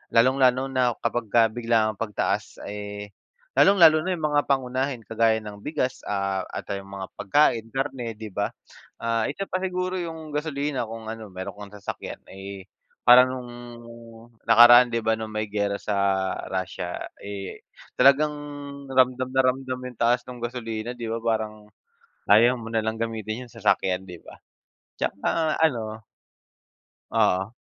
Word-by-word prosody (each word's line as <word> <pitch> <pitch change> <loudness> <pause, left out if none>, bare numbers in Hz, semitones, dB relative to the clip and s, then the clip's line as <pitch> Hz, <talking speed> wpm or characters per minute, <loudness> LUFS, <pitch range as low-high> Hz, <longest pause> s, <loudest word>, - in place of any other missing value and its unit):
lalong-lalo 130 +2 +4
na 125 -3 +1
kapagka 115 -1 +2
biglaang 110 -2 +1
pagtaas, 105 -1 -2
eh, 105 0 -7 0.5
lalong-lalo 165 -5 +7
na 185 - 0
'yung 160 - -8
mga 145 0 +3
pangunahin 130 -1 0
kagaya 115 0 +2
ng 105 -1 -9
bigas 130 -4 -1
ah 100 -2 -1
at, - - -6
ah, 100 - -1
'yung 100 0 -13
mga 95 -1 -5
pagkain, 115 +1 +3
karne, 135 -4 -3
'di 110 0 -8
ba. 100 +2 -2 0.5
Ah, 115 -1 0
isa 195 +7 -4
pa - - 0
siguro 185 0 -2
'yung 160 -2 -6
gasolina 145 -4 -2
kung 110 0 -8
ano 110 -1 -7
meron 95 +2 -6
kang 105 -1 -10
sasakyan, 100 0 -7
eh, 95 0 -8 0.4
parang 125 +1 +8
nung 125 -1 -7 1.0
nakaraan 120 +2 +8
'di 115 - +2
ba 110 0 +2
nung 110 -1 -6
may 110 0 -2
giyera 100 -1 0
sa 105 - -2 0.5
Russia, 95 -2 -4 0.2
eh, 100 -1 -7 0.3
talagang 140 +3 +6 0.6
ramdam 130 0 +3
na 130 - +5
ramdam 130 0 -1
'yung 125 - -15
taas 120 +1 +3
nung 125 -1 -8
gasolina, 120 -1 -4
'di 120 -1 -6
ba 115 - -2
parang 110 -2 -2 0.6
ayaw 120 +4 +6
mo 115 - -9
nalang 110 0 -1
gamitin 115 +1 -4
'yung 120 - -19
sasakyan, 95 -4 +1
'di 90 -1 -9
ba. - - -13 0.6
'Tsaka 155 +10 0
ano 110 -7 0 1.1
Oo. 95 +4 +1
115 Hz, 145 wpm, -25 LUFS, 105-130 Hz, 1.1 s, parang